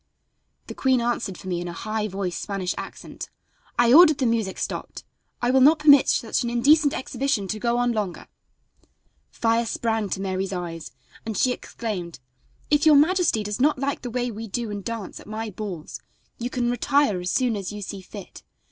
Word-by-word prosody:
The - - -7
queen 260 -2 +2
answered 235 -5 -2
for 190 - -11
me 175 -2 -2
in 175 - -5
a 170 - -5
high 215 +4 -3
voiced 190 -3 -4
Spanish 195 -3 -2
accent: - - -8 0.5
"I 240 0 +5
ordered 310 -1 +8
the 265 - 0
music 225 -5 0
stopped; - - -5 0.4
I 245 - +3
will 265 0 +4
not 300 +5 +7
permit 285 -3 +6
such 225 - +1
an 240 - -1
indecent 285 +5 +4
exhibition 260 -6 -2
to 215 - -3
go 235 +1 0
on 245 0 +2
longer." 210 -6 -3 1.0
Fire 230 0 +1
sprang 225 -3 -1
to 190 - -2
Mary's 190 0 -2
eyes 170 -3 -5 0.3
and 220 -2 -4
she 255 - +3
exclaimed: 195 - -5 0.5
"If 295 0 +4
your 305 - +8
majesty 315 - +3
does 210 +3 -3
not 295 +1 +3
like 275 +1 -2
the 245 - -5
way 245 0 -2
we 225 +1 -7
do 230 +1 -3
and 205 -1 -5
dance 230 -3 -5
at - - -14
my 215 +1 -5
balls 185 -5 -6 0.4
you 240 +1 -3
can 245 -1 0
retire 260 -5 +2
as 180 - -3
soon 250 0 +1
as 195 -2 -4
you 210 0 -6
see 195 0 -6
fit. 195 0 -11
225 Hz, 190 wpm, -24 LUFS, 195-255 Hz, 1.0 s, ordered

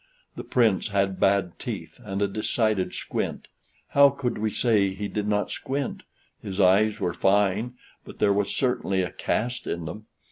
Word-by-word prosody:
The - - -6
Prince 110 -7 +2
had 100 -2 0
bad 95 -3 +2
teeth, - - -6
and 100 +1 -2
a - - +2
decided 110 -1 0
squint. - - -4 0.4
How 140 0 +7
could 135 -4 -3
we 110 0 0
say 100 -4 +2
he 105 +1 -3
did 105 0 -3
not 105 -1 0
squint? 140 0 -3 0.4
His 95 0 -6
eyes 100 +3 +4
were 90 - -1
fine, 100 +6 +2 0.3
but - - -12
there 100 -1 +3
was 100 0 0
certainly 100 -7 0
a 90 - -4
cast 125 +2 -2
in 85 -1 -3
them. 105 +7 -8
105 Hz, 170 wpm, -26 LUFS, 95-110 Hz, 0.4 s, How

